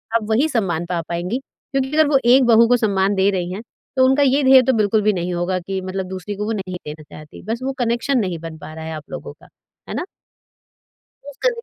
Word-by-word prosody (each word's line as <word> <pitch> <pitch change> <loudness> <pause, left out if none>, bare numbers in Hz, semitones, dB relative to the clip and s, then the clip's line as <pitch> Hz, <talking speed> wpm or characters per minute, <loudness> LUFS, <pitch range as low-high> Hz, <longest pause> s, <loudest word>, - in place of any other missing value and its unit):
आप 230 - +2
वही 240 +8 +3
सम्मान 180 - -1
पा 175 -1 -2
पाएँगी 175 +8 -2
क्योंकि 270 0 -5
अगर 310 -1 +5
वो 285 -1 +4
एक 255 +3 +6
बहू 230 -1 +6
को 245 +1 +4
सम्मान 200 -3 +1
दे 190 +1 +3
रही 180 -2 -2
हैं, 200 - -5 0.3
तो 260 -1 +5
उनका 265 +2 +4
ये 275 +1 +3
ध्येय 265 0 +8
तो 260 - +2
बिल्कुल 215 -1 +2
भी 210 0 +2
नहीं 180 -1 -2
होगा 175 +1 -1
कि 190 +2 -4
मतलब 185 0 -4
दूसरी 190 +2 -5
को 205 +1 -3
वो 220 - -2
नहीं 190 -3 -5
देना 150 +1 -8
चाहती। 150 0 -13
बस 225 +2 -2
वो 270 +1 -2
कनेक्शन 240 +4 0
नहीं 185 -6 -2
बन 165 0 -8
पा 155 0 -10
रहा 160 0 -8
है 160 - -5
आप 155 -1 -10
लोगों - - -7
का। - - -20 0.4
है - - -4
ना? - - -2 1.2
रोज़ 285 -1 -10
का - - +6
205 Hz, 245 wpm, -20 LUFS, 180-255 Hz, 1.2 s, ध्येय